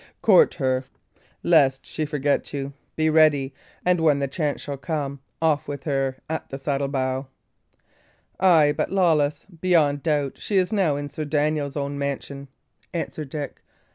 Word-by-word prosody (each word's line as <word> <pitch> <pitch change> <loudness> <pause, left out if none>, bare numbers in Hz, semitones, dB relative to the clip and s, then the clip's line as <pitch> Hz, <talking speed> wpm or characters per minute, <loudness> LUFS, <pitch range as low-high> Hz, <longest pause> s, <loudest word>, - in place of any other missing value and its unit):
Court 480 - +6
her, 130 -4 0 0.6
lest 135 -1 +4
that - - -18
she 155 - -2
forget 145 -1 -1
you. 140 0 -4 0.2
Be 160 0 +1
ready; 155 -4 +4 0.3
and 180 -1 +3
when 150 -3 +4
the 140 0 -1
chance 145 +1 -2
shall 145 - -4
come, 140 0 -3 0.2
off 155 -3 +1
with 140 -1 -5
her 135 -3 -1
at 160 0 -4
the 135 - -5
saddle 140 0 -1
bow." 130 -1 -2 1.1
"Ay, 160 -6 +5
but, - - -1
Lawless, 160 -6 +2
beyond 165 -5 +1
doubt 145 -3 0
she 205 - 0
is 185 +3 +2
now 185 -8 +2
in 145 0 -4
Sir 155 +2 -5
Daniel's 150 -1 0
own 140 0 -3
mansion." 140 0 -4 0.5
answered 155 -3 -4
Dick. 145 0 -6
145 Hz, 160 wpm, -24 LUFS, 140-160 Hz, 1.1 s, Court